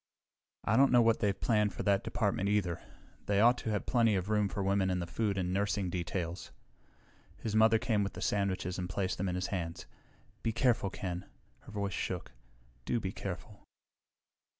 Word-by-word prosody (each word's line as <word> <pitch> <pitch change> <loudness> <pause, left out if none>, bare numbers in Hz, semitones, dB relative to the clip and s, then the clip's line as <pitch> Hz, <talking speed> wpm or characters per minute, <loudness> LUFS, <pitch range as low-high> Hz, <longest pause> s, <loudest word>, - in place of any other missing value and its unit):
"I - - +2
don't 140 +1 +6
know 120 -1 +6
what 115 -1 +3
they've 100 -3 0
planned 105 -3 +2
in - - -3
that 100 -1 +3
department, 100 -3 0
either. 100 -5 0 0.5
They 100 -1 +2
ought 120 +3 +6
to 110 - -4
have 105 -2 -1
plenty 115 -4 +3
of 95 +2 -1
room 105 -2 +2
for 100 - -3
women 95 -1 +2
in 90 - +1
the 85 - -2
food 100 +3 -1
and 90 -1 -1
nursing 100 -1 0
details." 90 0 -3 0.9
His 110 -2 -3
mother 110 +1 +6
came 110 -3 +1
with 100 - -3
the - - -8
sandwiches 95 -2 0
and 90 0 -3
placed 95 -1 -2
them 95 0 0
in 90 - -2
his 90 0 -1
hands. 85 -2 -3 0.6
"Be 115 - 0
careful, 120 -4 +2
Ken." 90 -2 -5 0.3
Her - - -14
voice 100 -2 -2
shook. - - -3 0.5
"Do 120 - 0
be 95 -3 -3
careful." 95 +2 -7
100 Hz, 190 wpm, -32 LUFS, 90-110 Hz, 0.9 s, don't